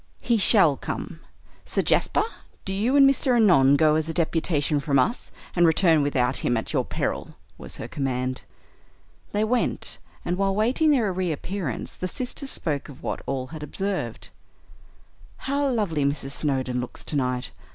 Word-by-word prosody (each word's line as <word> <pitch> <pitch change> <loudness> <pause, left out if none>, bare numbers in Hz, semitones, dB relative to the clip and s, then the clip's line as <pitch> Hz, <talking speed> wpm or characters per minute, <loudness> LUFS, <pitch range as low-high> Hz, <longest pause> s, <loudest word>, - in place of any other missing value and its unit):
"He 235 -1 +2
shall 200 - +5
come. - - -5 0.4
Sir - - -1
Jasper, - - +2 0.4
do 195 - -3
you 225 +8 +1
and 275 -1 +7
Mr. 270 -2 +2
Annon 165 - +5
go 155 +1 +4
as 160 +1 0
a 165 - -4
deputation 155 -3 +1
from 140 0 +1
us, 180 - 0 0.2
and 175 -1 +5
return 160 -1 +4
without 135 -2 +1
him 120 - +1
at 110 - -3
your - - +2
peril" - - -3 0.2
was - - -9
her - - -6
command. 130 -2 -2 0.9
They 210 +1 +1
went, 240 +3 0 0.3
and 175 +1 -1
while 195 -1 +1
waiting 250 +9 +2
their 230 -10 +2
reappearance 180 - -3
the 185 - -3
sisters 255 +6 -4
spoke 145 - -2
of 135 - -13
what - - -3
all 130 -2 -2
had 155 - -7
observed. 150 - -4 1.1
"How 280 +1 -1
lovely 205 - 0
Mrs. 140 -1 -1
Snowdon 130 -4 -1
looks 125 - -8
tonight. 125 -3 -2
160 Hz, 160 wpm, -25 LUFS, 140-210 Hz, 1.1 s, and